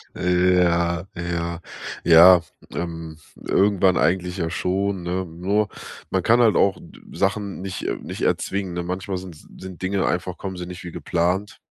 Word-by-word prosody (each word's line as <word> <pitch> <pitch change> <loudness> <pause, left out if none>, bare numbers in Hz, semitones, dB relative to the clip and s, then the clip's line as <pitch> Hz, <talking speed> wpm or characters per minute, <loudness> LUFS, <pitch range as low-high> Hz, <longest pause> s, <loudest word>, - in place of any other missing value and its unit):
Ja, 90 -1 +2
ja, 85 -1 -3 0.4
ja, 85 +1 +8 0.3
ähm, 80 -2 -5 0.2
irgendwann 95 -2 +2
eigentlich 90 +1 +1
ja 85 -2 -1
schon, 95 +2 -1
ne? 90 +2 -2
Nur, 95 +5 -1 0.4
man - - +1
kann 120 +2 +4
halt 110 -3 +4
auch 100 -1 +3
d - - -15 0.2
Sachen 100 -1 -1
nicht 95 -1 -5
äh, - - -1
nicht - - -8
erzwingen, 95 -2 -1
ne? 90 0 -3
Manchmal 95 +2 -3
sin 90 -2 -8
sind 95 +4 -12
Dinge 95 +1 0
einfach 90 0 -2
kommen 95 -2 -6
sie 90 0 -6
nicht 90 0 -8
wie 85 - -7
geplant, 90 +6 -1
90 Hz, 160 wpm, -23 LUFS, 85-95 Hz, 0.4 s, ja